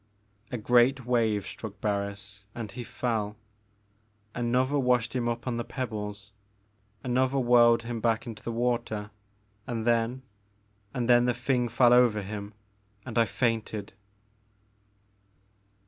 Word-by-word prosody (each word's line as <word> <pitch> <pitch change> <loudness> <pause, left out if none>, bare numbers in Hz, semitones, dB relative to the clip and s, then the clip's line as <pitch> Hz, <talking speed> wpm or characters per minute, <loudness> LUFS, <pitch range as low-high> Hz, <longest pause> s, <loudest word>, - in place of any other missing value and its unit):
A 125 - -2
great 125 +3 +3
wave 110 -5 +1
struck 105 -3 -8
Barris 100 -1 -3
and 110 -4 -5
he 120 +5 -6
fell, 110 -4 -2 1.0
another 125 +4 +1
washed 125 -2 +1
him 120 -2 0
up 120 +1 -4
on 125 -2 -2
the 120 - -2
pebbles, 105 -5 -5 0.7
another 130 +1 +1
whirled 120 -2 +5
him 115 -1 -4
back 115 -1 +1
into 115 -3 -8
the 115 - -4
water 115 -3 -1 0.6
and 115 -3 -3
then, 120 +2 +1 0.4
— 105 +2 -28
^and 125 -2 0
then 120 0 +5
the 125 -1 +1
thing 125 -1 0
fell 120 +1 +5
over 120 -4 +4
him, 100 +1 -7 0.2
— 100 0 -38
and 120 - -7
I 115 - +5
fainted. 110 -2 -2
115 Hz, 135 wpm, -28 LUFS, 105-125 Hz, 1.0 s, whirled